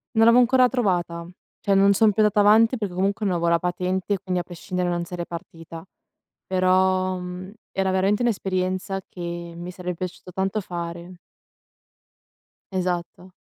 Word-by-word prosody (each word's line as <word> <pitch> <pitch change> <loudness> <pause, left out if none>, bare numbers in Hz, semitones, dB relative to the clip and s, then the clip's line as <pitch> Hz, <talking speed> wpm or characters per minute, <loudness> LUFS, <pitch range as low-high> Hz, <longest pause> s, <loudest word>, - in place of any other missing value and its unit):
Non 225 0 +5
l'avevo 235 +2 +7
ancora 255 +1 +5
trovata. 180 -9 -1 0.4
Cioè 200 - +1
non 195 +1 +5
son 215 +1 +4
più 210 +2 +1
andata 210 -1 +4
avanti, 220 +4 +5
perché 205 -5 -4
comunque 200 +3 0
non 185 -3 +1
avevo 170 0 0
la 170 0 +3
patente, 180 +3 -1
quindi 185 -1 -2
a - - -8
prescindere, 180 +1 -3
non 175 0 -1
sarei 175 0 -5
partita. 165 -1 -9 0.6
Però, 185 0 +2
mhmm, 180 +1 -7 0.2
era 190 0 0
veramente 195 +4 +2
un'esperienza 190 -3 -1
che 180 - -12 0.4
mi 175 +1 -6
sarebbe 180 -1 -5
piaciuto 180 +1 -7
tanto 195 +3 -1
fare. 170 -1 -6 1.6
Esatto. 180 0 -3
185 Hz, 150 wpm, -24 LUFS, 175-200 Hz, 1.6 s, l'avevo